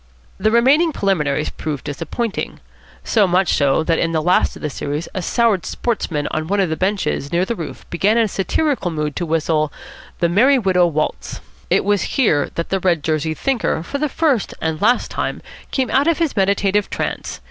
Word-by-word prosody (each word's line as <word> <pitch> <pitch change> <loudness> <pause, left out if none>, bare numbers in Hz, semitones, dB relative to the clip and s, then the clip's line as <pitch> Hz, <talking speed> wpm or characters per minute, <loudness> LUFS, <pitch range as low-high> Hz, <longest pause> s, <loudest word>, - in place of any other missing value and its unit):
The 215 +3 +2
remaining 270 +9 +4
preliminaries 155 - 0
proved 150 -3 -5
disappointing. 180 - -4 0.4
So 210 -4 +3
much 180 +1 +2
so 140 +2 +2
that 165 0 +1
in 165 0 0
the 160 - +1
last 180 +2 +2
of - - -12
the 150 - -1
series 145 +5 -4
a 185 - -3
soured 215 0 +1
sportsman 165 -11 -2
on 155 0 -2
one 200 +3 0
of 185 -5 +1
the - - 0
benches 185 -6 -1
near 175 +2 +2
the 235 - -2
roof 165 -6 -8
began 200 +6 +2
in 230 -1 +3
satirical 210 - 0
mood 150 -3 -3
to 175 - -2
whistle 155 -1 +1 0.5
the 170 - +2
"Merry 245 +11 +4
Widow 185 -6 +3
Waltz." 155 -2 -3 0.3
It - - +2
was 205 +4 0
here 160 - +3
that 170 - -3
the 195 - 0
red 175 -5 +1
jerseyed 155 0 -1
thinker 255 - 0
for 280 +11 -4
the 300 0 0
first 280 - 0
and 160 -1 -2
last 240 +4 +2
time - - -2 0.3
came 260 -5 -1
out 275 +4 +3
of 335 - +3
his 330 -4 0
meditative 200 0 +1
trance. - - -4
185 Hz, 190 wpm, -19 LUFS, 160-230 Hz, 0.5 s, remaining